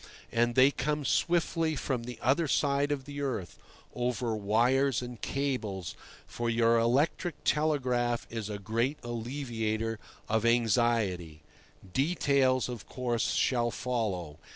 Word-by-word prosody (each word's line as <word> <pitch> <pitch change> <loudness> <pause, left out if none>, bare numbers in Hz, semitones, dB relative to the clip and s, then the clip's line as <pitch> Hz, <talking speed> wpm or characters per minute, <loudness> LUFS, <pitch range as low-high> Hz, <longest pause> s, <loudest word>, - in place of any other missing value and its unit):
And 120 0 +1
they 130 +2 +6
come 150 +1 -2
swiftly 165 -1 +1
from 130 -4 -2
the 125 -1 -7
other 140 +7 +3
side 140 0 +1
of 135 -2 -2
the 145 0 -6
earth, 120 -10 -3 0.3
over 120 -2 -1
wires 120 +5 +2
and 120 -2 -8
cables, 115 - -2 0.3
for 115 +9 -3
your 115 0 +3
electric 145 +8 +1
telegraph 125 -6 +1
is 110 -2 -4
a 105 - -3
great 115 +8 -1
alleviator 115 -2 -3 0.3
of 110 0 +1
anxiety. 115 -9 +1 0.5
Details, 135 -4 +2
of 120 -4 -7
course, 120 -2 -1
shall 120 -2 +2
follow. 100 -12 -3
120 Hz, 125 wpm, -30 LUFS, 115-140 Hz, 0.5 s, they